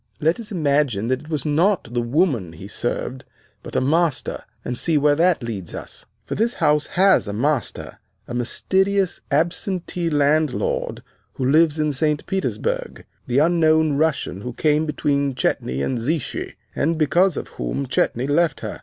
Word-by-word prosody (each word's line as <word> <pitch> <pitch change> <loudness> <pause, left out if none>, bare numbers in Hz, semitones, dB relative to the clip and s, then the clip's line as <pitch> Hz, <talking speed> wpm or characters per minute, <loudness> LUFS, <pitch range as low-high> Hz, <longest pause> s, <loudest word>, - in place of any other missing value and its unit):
Let 160 +7 +1
us 220 -2 -8
imagine 140 - +1
that 130 0 +1
it 155 +3 -14
was 150 -3 -2
not 160 - +1
the 120 - +1
woman 120 - 0
he 85 +4 -10
served, 125 +4 -3 0.4
but - - -10
a - - +3
master, 155 +2 0 0.2
and 125 - -2
see 160 +5 +1
where 145 0 +4
that 165 -2 +2
leads 100 -7 -5
us. - - -9 0.2
For - - -4
this 235 +2 0
house 150 0 +2
has 190 - +3
a 100 - -3
master, 135 +4 -2 0.3
a - - -6
mysterious, 190 +10 0
absentee 175 0 -1
landlord, 150 -1 0 0.3
who 130 - -3
lives 155 +2 +4
in 150 -1 0
St. 150 +2 0
Petersburg, 485 - -2 0.2
the 125 +1 0
unknown 160 -1 +4
Russian 140 -10 0
who 125 +2 -5
came 150 +4 +1
between 140 -2 0
Chetney 70 - -1
and 125 - -1
Zichy, 145 +4 -2 0.2
and 165 +2 +1
because 170 +3 +3
of - - -5
whom 60 - -3
Chetney 125 -1 0
left 150 +1 +1
her. - - -5
150 Hz, 165 wpm, -22 LUFS, 130-165 Hz, 0.4 s, where